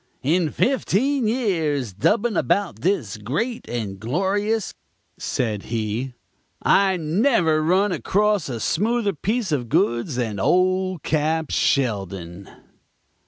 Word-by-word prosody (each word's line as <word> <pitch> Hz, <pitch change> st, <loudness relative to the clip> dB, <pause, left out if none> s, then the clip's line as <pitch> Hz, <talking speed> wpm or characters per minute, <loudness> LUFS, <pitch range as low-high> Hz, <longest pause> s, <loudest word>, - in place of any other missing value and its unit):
"In 160 Hz, +4 st, +2 dB
fifteen 260 Hz, -, +1 dB
years 160 Hz, -, 0 dB
dubbing 210 Hz, -, +1 dB
about 190 Hz, -, 0 dB
this 140 Hz, -, 0 dB
great 160 Hz, -, -3 dB
and 105 Hz, -5 st, -4 dB
glorious," 195 Hz, -, -1 dB, 0.5 s
said 110 Hz, -5 st, -2 dB
he, 115 Hz, +3 st, -3 dB, 0.5 s
"I 195 Hz, -2 st, +4 dB
never 165 Hz, -, +2 dB
run 185 Hz, +6 st, +2 dB
across 195 Hz, -, +1 dB
a 120 Hz, -3 st, -4 dB
smoother 210 Hz, -, 0 dB
piece 210 Hz, +5 st, -2 dB
of 125 Hz, -6 st, -1 dB
goods 120 Hz, +5 st, +1 dB
than 115 Hz, -5 st, -2 dB
old 185 Hz, -, +1 dB
Cap. 155 Hz, +1 st, 0 dB
Sheldon. 95 Hz, -7 st, -1 dB
160 Hz, 110 wpm, -22 LUFS, -, 0.5 s, I